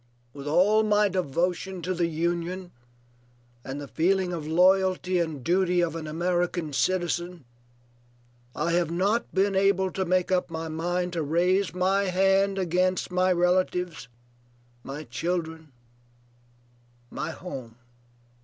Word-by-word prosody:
With 140 0 -8
all 190 +8 +4
my 210 -1 +3
devotion 180 +1 -2
to 185 +2 -1
the 170 -1 0
Union 175 +2 -2 0.9
and 135 +2 -6
the 145 - -7
feeling 180 +4 +1
of 155 -3 -5
loyalty 185 +2 +3
and 160 -6 -3
duty 180 +1 +2
of 165 -2 -1
an 160 -2 -5
American 175 -1 -1
citizen, 175 -1 -1 1.1
I 170 +3 -1
have 170 -1 +1
not 195 +7 0
been 195 +1 +1
able 190 -1 +2
to 190 - -2
make 185 0 +1
up 180 -1 +1
my 160 0 -5
mind 175 +3 -2
to 170 - -1
raise 175 +4 +1
my 190 +2 +2
hand 195 +1 +2
against 185 0 0
my 185 +1 +2
relatives, 180 -3 0 0.8
my 140 +3 -6
children, 160 +3 -4 1.4
my - - -4
home." 135 -9 -8
180 Hz, 125 wpm, -26 LUFS, 165-185 Hz, 1.4 s, all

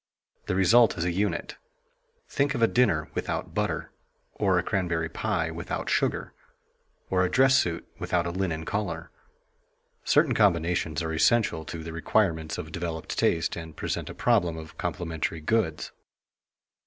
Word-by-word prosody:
The - - 0
result 105 +5 +5
is 85 - -1
a 90 - +1
unit. 100 +4 -2 0.7
Think 140 0 0
of 115 - +1
a - - +7
dinner 95 -13 +2
without - - -3
butter, - - -2 0.4
or 95 -3 +2
a 90 - +1
cranberry 85 -5 -1
pie 85 -3 -1
without 85 +1 -4
sugar, - - 0 0.8
or 95 -1 +3
a 90 - +1
dress 135 +4 +5
suit 85 -9 0
without 85 -1 0
a 85 - -2
linen 85 -3 -2
collar. 90 -6 -3 0.9
Certain - - +3
combinations 85 -1 +1
are 80 0 -2
essential 80 -1 +2
to 80 0 -6
the 80 0 -7
requirements 80 -2 0
of 80 - -6
developed 85 -2 -4
taste 80 - +1
and 80 -2 -8
present - - -3
a - - -8
problem 85 -2 +2
of 80 0 -9
complementary 80 -1 -3
goods. 80 -2 0
85 Hz, 150 wpm, -27 LUFS, 80-95 Hz, 0.9 s, a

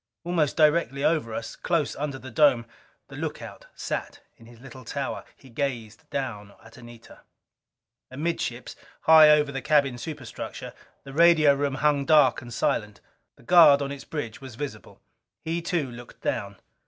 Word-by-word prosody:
Almost 165 -4 0
directly 150 -3 +2
over 155 -8 +1
us, 115 +1 -6
close - - -1
under 140 -2 -4
the 130 -1 -11
dome, 130 -4 +3 0.4
the - - -11
lookout - - -7
sat - - -5 0.2
in 115 - -18
his 120 -1 -16
little 130 0 -12
tower. 140 +4 -4
He 135 - -18
gazed 115 -5 -5
down 105 -7 -5
at 115 +1 -16
Anita. 120 -1 -14 0.9
Amidships, 130 -3 -4 0.3
high 160 -1 +8
over 150 -1 +4
the 135 -1 -5
cabin 140 -4 +2
superstructure, 140 -5 -7 0.3
the 135 - -11
radio 160 -2 +5
room 140 -1 -2
hung 145 -1 +1
dark 145 -4 +4
and 120 0 -11
silent. 105 -2 -2 0.4
The - - -21
guard 155 -2 +7
on 140 -1 -3
its 140 -1 -8
bridge 140 -8 -6
was 130 -4 -10
visible. 145 +3 -8 0.5
He 165 +1 -2
too, 165 -6 -2
looked 120 0 -13
down. 100 0 -3
135 Hz, 155 wpm, -25 LUFS, 120-150 Hz, 0.9 s, high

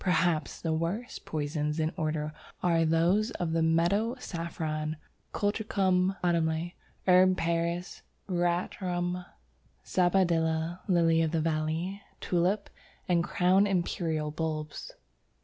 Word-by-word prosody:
Perhaps 175 -3 +1
the 160 -1 0
worst 175 +10 -3
poisons 150 0 -2
in 155 0 +1
this - - -13
order 155 -3 -2 0.3
are 165 -2 +3
those 170 +7 +3
of 175 -2 -1
the 165 0 +1
Meadow 175 +9 +2
Saffron 160 -6 -4 0.3
(Colchicum 195 -3 +1
autumnale), 170 0 +1 0.3
Herb 185 0 +5
Paris, 170 +2 -1 0.3
Veratrum, 175 0 -1 0.6
Sabadilla, 170 -2 +1
Lily 165 -3 +4
of 160 - +2
the 165 +1 0
Valley, 160 +5 -1 0.2
Tulip, 185 +4 0 0.4
and 175 -2 +3
Crown 185 +3 +3
Imperial 165 -5 -1
bulbs. 155 -1 -4
170 Hz, 110 wpm, -29 LUFS, 160-185 Hz, 0.6 s, Herb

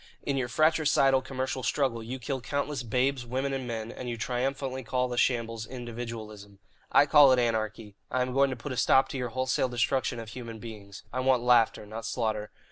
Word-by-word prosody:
In 140 - -1
your 130 -2 0
fratricidal 145 -2 +3
commercial 130 0 -3
struggle 130 -2 0
you 120 +4 -5
kill 130 +1 -4
countless 145 +1 -2
babes, 125 +3 0
women, 130 +3 -2
and 130 -2 -3
men, 115 -1 -4
and 125 0 -6
you 120 - -3
triumphantly 130 +2 -2
call 125 +1 -1
the 125 - -4
shambles 115 -3 0
'individualism.' 115 -5 -7 0.3
I - - +6
call 145 -2 +7
it - - +3
anarchy. 110 -3 -1
I 125 +1 +1
am 125 0 -4
going 135 +1 +4
to 130 - -3
put 125 +4 -7
a 130 - -4
stop 135 +2 +4
to - - -4
your 125 -1 -2
wholesale 130 +1 0
destruction 125 +2 0
of 115 -1 -7
human 115 -1 -7
beings. 105 -3 -10
I 130 - -1
want 130 -2 +2
laughter, 120 -3 +3
not 110 +2 -6
slaughter. 110 -3 -2
125 Hz, 200 wpm, -28 LUFS, 115-130 Hz, 0.3 s, call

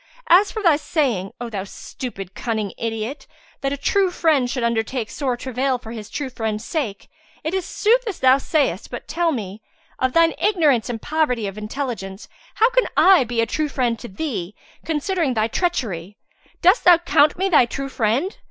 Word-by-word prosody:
As 385 +4 +6
for 435 - -5
thy 330 -5 +5
saying, 250 - -1
O 240 - -4
thou 205 -4 -4
stupid, 195 -1 -8
cunning 215 -3 -3
idiot! 225 +4 -4 0.3
that 275 0 -1
a 280 - -2
true 380 +7 +2
friend 310 -8 +2
should 250 -1 -2
undertake 235 0 -1
sore 260 -4 -2
travail 260 +1 -1
for 225 -2 -10
his 220 -2 -8
true 280 -2 -4
friend's 220 -2 -3
sake, 235 -12 -3 0.4
it 315 - -2
is 380 -2 -2
sooth 480 +3 +2
as 400 - -3
thou 260 +1 +5
sayest, 270 - 0
but 245 - -7
tell 335 +2 0
me, 210 -6 -5 0.4
of 260 0 0
thine 330 -1 +4
ignorance 300 - +2
and 225 -2 -5
poverty 290 -8 0
of 195 -1 -5
intelligence, 215 -3 -5 0.3
how 455 +3 +4
can - - +2
I 375 -7 +7
be 235 0 0
a - - +2
true 305 +5 -2
friend 245 -5 -1
to 240 - -8
thee, 205 - -4 0.3
considering 320 -3 -1
thy 220 0 +2
treachery. 215 - -2 0.5
Dost 370 +7 +5
thou 355 -1 +8
count 305 -3 +3
me 380 +2 +1
thy 300 -10 +5
true 275 +3 -4
friend? 260 - -1
260 Hz, 185 wpm, -21 LUFS, 225-320 Hz, 0.5 s, thou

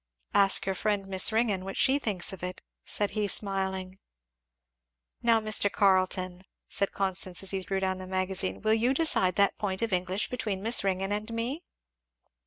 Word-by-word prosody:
"Ask 195 -1 +4
your 195 - -1
friend 205 0 -2
Miss 190 +2 +4
Ringgan 220 -4 0
what 195 0 -7
she 275 +1 +3
thinks 200 -7 0
of 190 - -10
it," 180 0 -7 0.2
said 205 -1 -2
he 210 -1 -2
smiling. 190 -1 +1 1.2
"Now 230 -1 +3
Mr. 215 -2 +2
Carleton," 185 -2 +1 0.3
said 200 - -1
Constance 190 -1 -1
as 195 - +3
he 195 -1 -2
threw 195 +1 -3
down 190 -1 -2
the 185 - -9
magazine, 185 +1 -2
"will 215 0 +2
you 240 +4 +1
decide 225 - +2
that 200 -1 +1
point 195 -1 -3
of 225 -3 -2
English 185 +2 -2
between 210 -6 -4
Miss 230 0 +4
Ringgan 195 0 -2
and 210 +2 -4
me?" 235 +7 -4
195 Hz, 175 wpm, -27 LUFS, 185-215 Hz, 1.2 s, Ask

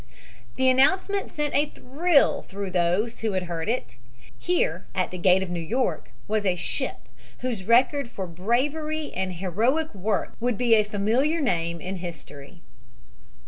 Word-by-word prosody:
The 260 0 +2
announcement 370 +10 +3
sent 295 -1 -2
a 290 +2 +2
thrill 295 +3 +2
through 195 -1 -6
those 180 +6 +1
who 220 -2 -1
heard 175 -1 -2
it. 230 - -2 0.4
Here, 170 +4 0
at 185 - 0
the 180 - -6
gate 185 +1 +4
of 180 - -6
New 175 - -2
York, 180 - -1 0.2
was 215 0 0
a 185 -3 +2
ship 175 - -3 0.3
whose 230 -7 -3
record 255 +4 +4
for 195 -4 -5
bravery 285 - -1
and 185 0 -2
heroic 225 - 0
work 200 +1 -1
would 240 -2 0
be 240 -2 +3
a 215 -1 +6
famuliar 225 +10 +1
name 170 - 0
in 185 +2 -5
history. 165 -1 -9
210 Hz, 150 wpm, -25 LUFS, 180-260 Hz, 0.4 s, a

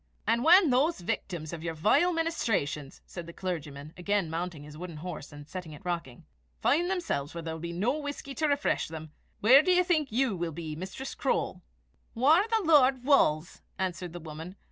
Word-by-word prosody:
"And 230 +2 +2
when 345 -1 +7
those 285 +7 +2
victims 170 -2 -4
of 165 - -6
your 165 -1 -3
vile 215 - +3
ministrations," 220 - -1
said 175 -2 -8
the 170 - -9
clergyman, 155 -5 -5
again 190 -2 -1
mounting 165 -2 -4
his 150 0 -11
wooden 170 0 -7
horse, 160 -2 -7
and 145 0 -11
setting 180 -2 -7
it 150 - -13
rocking, 170 -9 -4 0.3
"find 340 +6 +2
themselves 250 - -2
where 170 - -5
there 160 0 -4
will 160 - -7
be 170 0 -4
no 225 - 0
whisky 285 -1 -6
to 310 +2 0
refresh 285 0 +1
them, 160 -1 -8 0.3
where 255 +7 +8
do 365 - +1
you 360 0 +5
think 315 -7 +1
you 245 -2 +1
will 170 -2 -3
be, 155 -1 -5
Mistress 190 - -6
Croale?" - - -1 0.5
"Whaur 310 - +4
the 450 -2 +1
Lord 270 -5 +5
wulls," 175 - +2 0.2
answered 185 -2 -3
the 175 - -6
woman. 160 +3 -8
180 Hz, 190 wpm, -29 LUFS, -, 0.5 s, where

